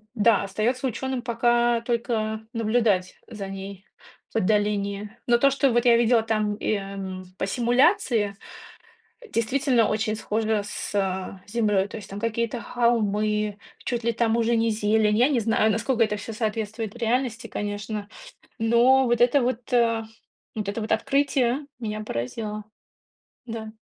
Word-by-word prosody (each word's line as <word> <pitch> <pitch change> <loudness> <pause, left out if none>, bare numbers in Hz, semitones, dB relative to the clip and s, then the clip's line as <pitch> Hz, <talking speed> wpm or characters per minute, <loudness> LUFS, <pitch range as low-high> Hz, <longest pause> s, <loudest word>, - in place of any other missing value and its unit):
да, 215 -2 +4
остаётся 235 +7 -1
учёным 260 +1 -3
пока 240 0 +2
только 220 -2 -2
наблюдать 220 -5 +1
за 200 -3 -7
ней 195 0 -8 0.5
в - - -1
отдалении. 205 0 0 0.2
Но 240 -1 +5
то, 275 +3 +4
что 275 -1 +2
вот 240 - +3
я 235 -1 +6
видела 235 0 +4
там, 215 -2 0
эм, 195 -2 -3
по - - -1
симуляции, 240 - +2 1.0
действительно, 245 0 +2
очень 215 0 0
схоже 220 0 -1
с 210 - -5 0.6
Землёй. 205 -3 +1
То 215 - -8
есть 205 - -10
там 200 - -6
какие-то 230 +1 -2
холмы, 215 -3 0 0.3
чуть 240 -2 -2
ли 235 - +2
там 230 0 +1
уже 235 0 +2
не 225 0 +2
зелень. 215 0 +2
Я 250 +5 +4
не 265 - +2
знаю, 220 0 +2
насколько 230 +2 +1
это 210 -1 -1
всё 220 +2 -7
соответствует 220 -1 -3
реальности, 235 0 -1
конечно, 205 0 -4 0.5
но 240 +3 +4
вот 240 -1 +1
это 250 +3 +5
вот, 245 -1 -2
э, 230 -2 +3 0.5
вот 210 -2 -3
это 210 +2 -3
вот 215 - -4
открытие 275 -1 +1
меня 215 -2 -4
поразило. 210 - -4 0.8
Да. 225 -2 -6
225 Hz, 145 wpm, -25 LUFS, 210-240 Hz, 1.0 s, я